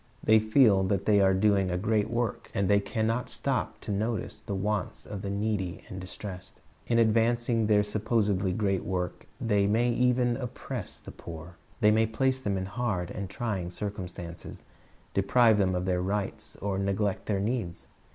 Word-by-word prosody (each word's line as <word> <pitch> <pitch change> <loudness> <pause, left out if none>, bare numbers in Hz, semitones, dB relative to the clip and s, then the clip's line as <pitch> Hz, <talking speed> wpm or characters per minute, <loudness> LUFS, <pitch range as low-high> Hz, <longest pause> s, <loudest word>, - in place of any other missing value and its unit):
They 110 0 +6
feel 110 -2 +5
that 100 0 0
they 105 -2 +5
are 95 -1 +4
doing 100 -1 +3
a 90 - 0
threat 105 +2 +1
work, 120 -2 -2
and 100 -1 +1
they 100 +1 +5
can 110 +2 -2
not 115 +2 -1
stop - - -2
to - - -5
notice 110 +3 -2
tlie 100 - -2
wants 105 0 -2
of 100 -2 -6
the 100 - -4
needy 100 -3 -2
and 95 - -6
distressed. 95 0 -8 0.3
In 115 - +2
advancing 115 0 +3
their 105 -1 +4
supposedly 105 -2 +1
great 95 -1 0
work 90 -1 -3
they 105 -3 +2
may 115 +4 +2
even 125 0 +2
oppress 125 -3 -5
the - - -10
poor. 85 +1 -10 0.2
They 105 -1 +6
may 110 +1 +3
place 130 +4 +1
them 100 -6 -1
in 95 - -2
hard 95 -4 -2
and 100 -2 -5
trying 100 -4 -3
circumstances, 90 -3 -6 0.5
deprive 110 +2 +4
them 95 -2 +2
of 90 0 -1
their 90 -1 +1
rights, 100 +2 -2
or 95 -1 -2
neglect 100 0 -1
their 100 -2 +1
needs. 100 -6 -2
105 Hz, 175 wpm, -28 LUFS, 95-110 Hz, 0.5 s, They